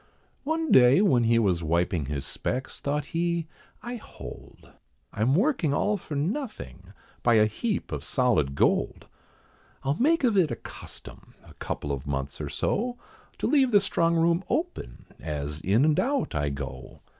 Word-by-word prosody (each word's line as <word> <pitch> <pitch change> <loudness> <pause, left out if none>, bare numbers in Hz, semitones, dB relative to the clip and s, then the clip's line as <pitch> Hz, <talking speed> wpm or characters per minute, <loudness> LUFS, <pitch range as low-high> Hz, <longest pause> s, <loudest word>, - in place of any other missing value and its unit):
One 320 +1 -1
day, 125 +3 +7
when 130 - +3
he 115 +1 +4
was 95 -7 +2
wiping 85 -2 0
his 70 -2 -3
specks, 130 +1 -4
thought 145 0 -1
he, 170 0 0 0.4
"I 240 +1 -5
hold, - - -12 0.4
I'm 120 +6 +2
working 185 - +2
all 210 +6 +1
for 165 -6 -6
nothing 150 - -4 0.3
by 120 -1 +4
a 110 -1 +6
heap 200 - -2
of - - -4
solid 105 - +1
gold. - - +1 0.8
I'll 135 - +1
make 320 +3 +3
of 235 -4 +3
it 180 -6 +4
a 120 - -2
custom, - - -11
a - - -15
couple 75 - -4
of 70 0 -4
months 70 +1 -3
or 75 - -4
so, 240 - -1 0.4
To - - -3
leave 275 -4 +4
the 205 -3 +6
strong 170 -3 +1
room 170 +2 +2
open 325 - -3
as 75 -1 -4
in 110 - +3
and 155 -1 +3
out 275 +1 0
I 75 -1 0
go. 70 -1 -7
140 Hz, 165 wpm, -27 LUFS, -, 0.8 s, day